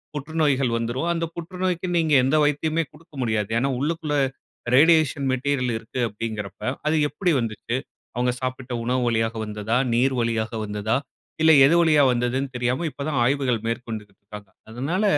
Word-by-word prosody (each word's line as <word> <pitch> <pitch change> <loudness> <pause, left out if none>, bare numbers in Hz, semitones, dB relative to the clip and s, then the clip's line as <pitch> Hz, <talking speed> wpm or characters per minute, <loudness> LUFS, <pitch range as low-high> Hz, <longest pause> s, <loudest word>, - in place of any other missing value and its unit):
புற்றுநோய்கள் 145 -4 0
வந்துரும். 120 +8 -2
அந்த 165 0 -1
புற்றுநோய்க்கு 180 +1 -3
நீங்க 160 -2 +2
எந்த 135 +4 +2
வைத்தியமுமே 155 +3 +1
கொடுக்க 160 +1 -20
முடியாது. 110 -4 0
ஏனா 135 +4 +1
உள்ளுக்குள்ள 155 +1 -1 0.6
ரேடியேஷன் 155 -1 +4
மெட்டீரியல் 130 -1 0
இருக்கு 115 +3 -7
அப்டிங்கிறப்ப 105 -1 -6 0.3
அது 155 - +2
எப்படி 180 +2 0
வந்துச்சு, 115 0 -3 0.4
அவங்க 125 +1 +1
சாப்பிட்ட 130 0 -4
உணவு 125 +2 0
வழியா 115 -1 +2 0.2
வந்ததா, 105 +2 -2 0.2
நீர் 130 +3 +2
வழியாக 115 -1 -1
வந்ததா, 105 +1 -1 0.5
இல்ல 160 0 +6
எது 155 +5 +4
வழியா 155 -3 +4
வந்ததுனு 125 +3 0
தெரியாம 125 +6 -1
இப்ப 140 - -7
தான் 150 -4 0
ஆய்வுகள் 130 -2 +1
மேற்கொண்டு 115 -2 -4
இருக்கிறாங்க, 100 +1 -13 0.2
அதனால, 140 - -2
130 Hz, 145 wpm, -23 LUFS, 115-155 Hz, 0.6 s, இல்ல